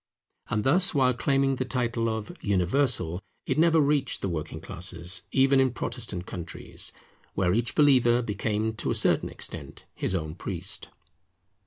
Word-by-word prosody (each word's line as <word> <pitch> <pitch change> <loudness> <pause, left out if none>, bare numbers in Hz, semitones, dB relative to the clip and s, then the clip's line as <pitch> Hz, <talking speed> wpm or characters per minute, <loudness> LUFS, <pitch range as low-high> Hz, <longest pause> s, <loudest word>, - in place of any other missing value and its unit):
And 105 0 0
thus, 175 +6 +4
while 130 -2 +4
claiming 135 +2 +1
the 130 - 0
title 120 -2 -1
of 110 -1 -4
Universal, 95 - +1 0.2
it 135 +2 0
never 165 0 +5
reached 145 -2 +1
the 100 - 0
working 80 -1 -4
classes, 90 0 -2
even 135 0 +4
in 130 0 +4
Protestant 90 -6 -3
countries, 85 -3 -6 0.4
where 90 -2 +2
each 120 +3 0
believer 125 -5 +5
became 110 +1 -1
to - - -2
a - - +1
certain - - +2
extent 75 -5 -5
his 95 - -2
own 80 -3 -3
priest. 95 +3 -5
110 Hz, 150 wpm, -27 LUFS, 90-135 Hz, 0.4 s, never